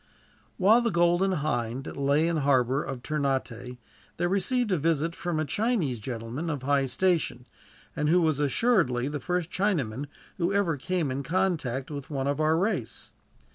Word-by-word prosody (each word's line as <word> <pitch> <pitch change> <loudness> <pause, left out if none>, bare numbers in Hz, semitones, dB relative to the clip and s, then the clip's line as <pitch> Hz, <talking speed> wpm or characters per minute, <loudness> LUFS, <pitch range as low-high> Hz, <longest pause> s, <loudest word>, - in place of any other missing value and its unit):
While 215 +6 +5
the 235 - +1
Golden 175 +1 +2
Hind 135 -5 -2
lay 140 +3 +2
in 170 - 0
the - - 0
harbor 135 -1 +2
of 130 -2 -6
Ternate, 130 -4 -2 0.4
they 175 - 0
received 210 +5 +1
a 185 - +3
visit 165 +1 0
from 175 -3 -2
a 155 - 0
Chinese 180 - 0
gentlemen 120 +7 -5
of 145 -4 -3
high 140 0 +2
station, 150 -3 0 0.5
and 150 0 0
who 180 +3 +5
was 155 -4 +1
assuredly 145 - +2
the 145 0 -4
first 175 +3 -2
Chinaman 145 - -1 0.3
who 175 +2 +1
ever 200 -5 +1
came 165 0 -1
in 135 +2 -2
contact 155 -5 -1
with 140 -2 -6
one 135 -3 -2
of 140 +1 -1
our 155 +1 +3
race. 180 - -2
150 Hz, 170 wpm, -27 LUFS, 135-180 Hz, 0.5 s, While